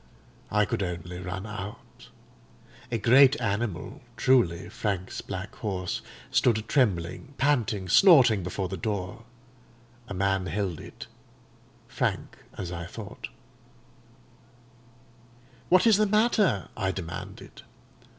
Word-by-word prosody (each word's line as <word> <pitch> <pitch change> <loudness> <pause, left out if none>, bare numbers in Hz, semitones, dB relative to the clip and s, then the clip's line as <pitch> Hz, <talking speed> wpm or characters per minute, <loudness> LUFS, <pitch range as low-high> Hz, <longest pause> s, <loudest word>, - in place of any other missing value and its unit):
"I 105 0 +3
could 100 - -2
only 90 -1 -4
run 90 +2 -5
out. 105 -1 -9 0.8
A 115 - +1
great 130 +6 +6
animal—truly, 100 -1 0
Frank's 95 -3 -3
black 95 +1 -6
horse—stood 105 +3 -1
trembling, 115 - 0
panting, 115 -9 +1
snorting 130 - +6
before 90 +2 -3
the - - -5
door; 105 +1 -4 0.8
a 100 - -6
man 95 0 0
held 90 -1 -2
it, - - -10 0.8
Frank, - - -2 0.2
as 90 -2 -5
I 85 -1 -5
thought. - - -8 2.4
"'What 185 +3 +5
is 220 -3 +6
the 215 0 +3
matter?' 210 - +2
I 95 -3 -1
demanded. 85 -2 -8
100 Hz, 100 wpm, -27 LUFS, 90-120 Hz, 2.4 s, great